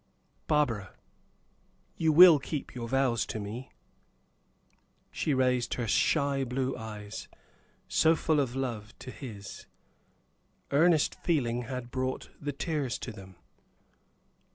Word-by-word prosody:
"Barbara, 115 -11 0 1.0
you 160 -1 +2
will 170 -1 +9
keep 145 +1 -5
your 120 -2 -5
vows 130 -3 +1
to 110 - -4
me?" 110 +6 -6 1.4
She - - -1
raised 125 -2 +1
her 120 -2 -3
shy 140 +5 +2
blue 130 +1 -2
eyes, 105 -1 -7 0.6
so 160 +1 +4
full 155 -1 +1
of 130 -3 -1
love 115 -6 -4
to 130 - -9
his; 105 -8 -9 1.0
earnest 155 +2 +4
feeling 125 -7 -1
had 125 -1 -6
brought 130 0 -3
the 145 0 -2
tears 145 -3 -2
to 120 - -6
them. 95 -3 -12
130 Hz, 115 wpm, -29 LUFS, 115-145 Hz, 1.4 s, will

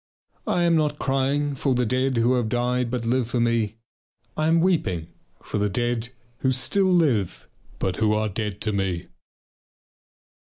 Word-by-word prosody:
I 175 - +1
am 170 -1 +3
not 150 -2 +1
crying 140 +2 0
for 135 -1 0
the 125 0 +1
dead 130 +2 0
who 120 +2 +3
have 120 -3 0
died 125 +1 0
but 120 -1 -3
live 120 0 +1
for 120 - -1
me. 115 -2 +1 0.6
I 155 0 0
am 165 +1 +4
weeping 95 - 0 0.3
for 105 - -3
the 105 0 +1
dead 120 +2 -1 0.3
who 130 - +1
still 185 +10 +2
live 135 - +1 0.3
but 95 -1 -2
who 105 -1 +2
are 110 0 0
dead 105 0 -4
to 110 - -1
me.... 95 -3 -1
120 Hz, 165 wpm, -24 LUFS, 110-135 Hz, 0.6 s, am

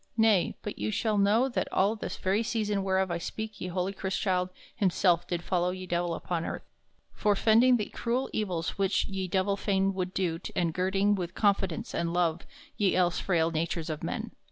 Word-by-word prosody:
Nay, 220 -5 +3
but 210 - -5
you - - -1
shall 215 0 0
know 215 +6 +4
that 255 - -2
all 200 +4 +2
this 215 - -5
very 195 +4 +1
season 215 -3 -1
whereof 190 -1 +1
I 170 - -1
speak 220 +4 -6
ye - - -3
holy 180 +2 -2
Chrystchilde 190 -1 -1 0.3
himself 180 -3 +2
did 175 -1 -2
follow 180 0 +1
ye 185 0 -5
Divell 175 -1 -1
upon 170 -1 -3
earth, - - -5 0.5
forefending 225 +4 +4
the 210 - -2
crewel 245 +3 -1
evills 185 -5 -2
which 195 -1 +2
ye 190 -1 -3
Divell 195 +2 +1
fain 195 -1 +1
wolde 185 -1 -3
do 170 -3 0 0.2
and 170 -2 +1
girding 195 +3 +2
with 180 -3 -3
confidence 195 -5 +1
and 170 0 -1
love 175 -2 0 0.3
ye 200 -4 +2
else 175 -1 +2
frail 165 -3 +1
natures 165 0 -2
of 155 - -5
men. - - -3
190 Hz, 185 wpm, -29 LUFS, 175-205 Hz, 0.5 s, know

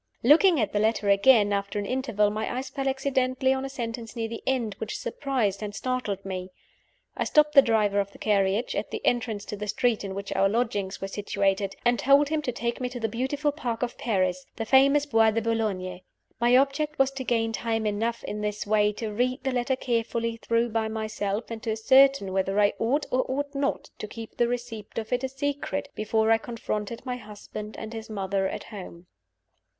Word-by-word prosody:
Looking 320 +6 +6
at 215 -3 0
the 205 - +2
letter 215 -1 +1
again, 205 0 +5
after 200 +1 -2
an 205 - -1
interval, 235 -4 +1
my 215 +3 -3
eyes 260 - -4
fell 275 -1 -3
accidentally 265 -1 +1
on 265 0 -2
a 270 - -4
sentence 235 -3 -5
near 225 -1 -2
the 230 0 -6
end, 245 -5 0
which 220 - -4
surprised 235 -6 -1
and 205 -1 -5
startled 215 -6 -2
me. 185 -1 -4 0.7
I - - 0
stopped 300 0 +3
the 275 - +10
driver 215 -5 +2
of 200 0 -1
the - - -15
carriage, 200 +2 +1
at - - -2
the - - -5
entrance 225 -4 0
to - - -5
the 210 +1 -5
street 230 +1 +1
in 195 -1 -5
which 200 0 -4
our 195 +1 +3
lodgings 205 -4 -1
were 195 - -2
situated, 195 0 -1
and 240 0 +3
told 280 +2 +5
him 310 -1 0
to 260 - -2
take 235 +1 -3
me 250 - -1
to 245 0 -6
the 225 - 0
beautiful 265 +6 -1
park 245 -6 -3
of 245 - -2
Paris 185 -5 0
the 225 - -3
famous 275 +4 +5
Bois 225 -5 +4
de 220 +1 +1
Boulogne. 205 -5 -2 0.4
My 240 +2 +5
object 290 +3 +1
was 270 0 +3
to 270 -1 -5
gain 225 -2 +1
time 225 -1 -1
enough, 225 +3 -1
in 210 - -4
this 210 0 -2
way, 210 0 +3
to 215 0 -5
read 255 +4 0
the 265 - 0
letter 250 +1 0
carefully 230 -2 -1
through 230 +1 0
by 220 0 0
myself, 215 0 -3
and 225 -1 -5
to 225 - -1
ascertain 260 -2 +4
whether 195 +1 +1
I 205 0 +4
ought 275 +6 +1
or 255 +1 +2
ought 285 +2 -2
not 280 0 -2
to 215 - -5
keep 225 +1 -9
the 240 - +3
receipt 235 -3 -5
of 225 +1 -3
it 250 +1 0
a 265 - -1
secret 285 +1 -3
before 220 +1 +1
I 225 - +5
confronted 225 -1 -4
my 250 -1 -3
husband 210 -1 -9
and 220 +1 -7
his 225 -1 -7
mother 195 -2 -1
at - - -5
home. 180 -4 -10
225 Hz, 210 wpm, -26 LUFS, 210-255 Hz, 0.7 s, the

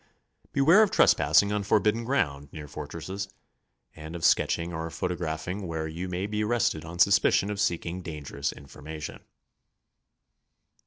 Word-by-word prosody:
Beware 160 +9 +6
of 215 - +4
trespassing 80 - +4
on 105 0 0
forbidden 105 +3 +1
ground 75 - -1
near 75 -2 -8
fort - - -7
resses, 95 +4 -5 0.7
and 80 +2 -8
of 85 0 -2
sketching 85 0 +2
or 80 0 -4
photographing 90 +2 -3
w^here 80 -1 -4
you 90 +3 -5
may 90 +2 -2
be 105 +1 -2
arrested 105 -8 0
on 85 +2 -8
suspicion 100 +2 +4
of 100 - -4
seeking 90 -2 -1
dangerous 70 -4 -4
information. 75 +2 -9
85 Hz, 140 wpm, -27 LUFS, 80-100 Hz, 0.7 s, Beware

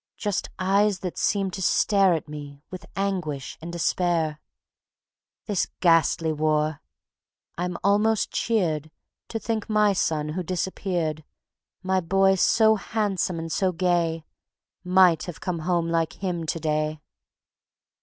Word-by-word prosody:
Just 205 -3 -2
eyes 195 +1 +2
that 180 -2 -4
seemed 195 -2 0
to 190 - -5
stare 195 -1 +3
At 155 - -5
me 145 -1 -9
with 185 - -8
anguish 180 -9 -2
and 170 +1 -6
despair. 170 -2 0 1.1
This 205 -4 0
ghastly 165 -1 +3
war! 155 0 0 0.7
I'm 180 0 -3
almost 210 +2 +2
cheered 160 -9 0 0.4
To 225 - -4
think 220 0 -3
my 210 -1 +3
son 155 -4 0
who 175 +4 -3
disappeared, 175 -3 -2 0.6
My 190 0 +1
boy 195 +2 +3
so 220 +3 +4
handsome 195 -4 -1
and 165 0 -5
so 185 +3 +1
gay, 170 -2 0 0.6
Might 180 -3 +4
have 175 -3 -8
come 180 -2 -3
home 170 +1 0
like 165 -1 0
him 175 -4 -3
to 165 - -2
day." 155 -1 -1
180 Hz, 130 wpm, -25 LUFS, 160-195 Hz, 1.1 s, so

